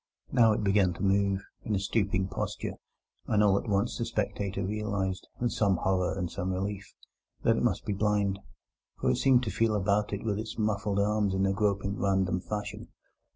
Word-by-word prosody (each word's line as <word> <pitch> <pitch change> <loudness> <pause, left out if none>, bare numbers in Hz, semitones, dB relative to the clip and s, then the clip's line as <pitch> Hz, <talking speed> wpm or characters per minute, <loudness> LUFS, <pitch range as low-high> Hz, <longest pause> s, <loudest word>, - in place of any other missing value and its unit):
Now 115 -2 +5
it 105 - -1
began 100 -2 +3
to 85 - -6
move, 100 0 +2 0.2
in 105 - -1
a - - +1
stooping 100 -1 0
posture, - - -4 0.5
and 105 -1 +3
all 100 -2 +5
at 115 - -7
once 100 +3 0
the 115 - 0
spectator 100 -3 -2
realized, 100 -2 -2
with 120 -1 0
some 100 -3 +2
horror 95 0 0
and 90 -2 -1
some 95 0 -2
relief, 100 +1 -3 0.5
that - - +4
it - - 0
must - - 0
be 105 - -1
blind, 100 -1 +1 0.6
for - - +2
it - - 0
seemed 130 -2 +4
to 110 - -2
feel 115 -1 +1
about 105 +1 +1
it 100 - -3
with 105 -2 -1
its 110 0 -6
muffled 105 -2 0
arms 105 -1 +1
in 95 +1 +2
a 95 - +2
groping 100 -1 0
and 100 - -5
random 95 -2 +1
fashion. 105 +2 -5
100 Hz, 200 wpm, -29 LUFS, 95-105 Hz, 0.6 s, Now